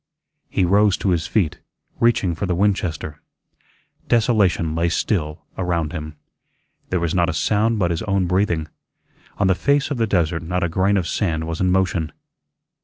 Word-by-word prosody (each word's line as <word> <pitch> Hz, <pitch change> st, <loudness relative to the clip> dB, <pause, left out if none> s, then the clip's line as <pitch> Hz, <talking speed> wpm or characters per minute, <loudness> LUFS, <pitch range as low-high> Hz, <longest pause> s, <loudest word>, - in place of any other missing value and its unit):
He 95 Hz, -, +1 dB
rose 100 Hz, +2 st, +3 dB
to 95 Hz, -, 0 dB
his 85 Hz, -1 st, 0 dB
feet, 95 Hz, -9 st, 0 dB, 0.4 s
reaching 115 Hz, -7 st, +2 dB
for 95 Hz, +4 st, -3 dB
the 90 Hz, -, 0 dB
Winchester. 85 Hz, -6 st, -1 dB, 0.9 s
Desolation 105 Hz, -9 st, +2 dB
lay 85 Hz, +1 st, +1 dB
still 80 Hz, -3 st, -2 dB
around 85 Hz, -4 st, -1 dB
him. 75 Hz, -3 st, -6 dB, 0.7 s
There 90 Hz, -, 0 dB
was 85 Hz, -1 st, -1 dB
not 85 Hz, -1 st, +2 dB
a -, -, -1 dB
sound 110 Hz, +7 st, +1 dB
but 90 Hz, -4 st, +1 dB
his 85 Hz, -, -2 dB
own 100 Hz, -2 st, 0 dB
breathing; 90 Hz, -3 st, 0 dB, 0.7 s
on 100 Hz, -, +1 dB
the 95 Hz, -, +4 dB
face 140 Hz, +8 st, +1 dB
of 140 Hz, -, -1 dB
the 115 Hz, -1 st, +1 dB
desert 85 Hz, -4 st, +1 dB
not 90 Hz, +2 st, -2 dB
a 85 Hz, -, 0 dB
grain 95 Hz, +4 st, +2 dB
of 90 Hz, -3 st, -1 dB
sand 80 Hz, -6 st, -1 dB
was 80 Hz, +1 st, -4 dB
in 90 Hz, -, +2 dB
motion. 90 Hz, -4 st, 0 dB
90 Hz, 175 wpm, -21 LUFS, 80-100 Hz, 0.9 s, the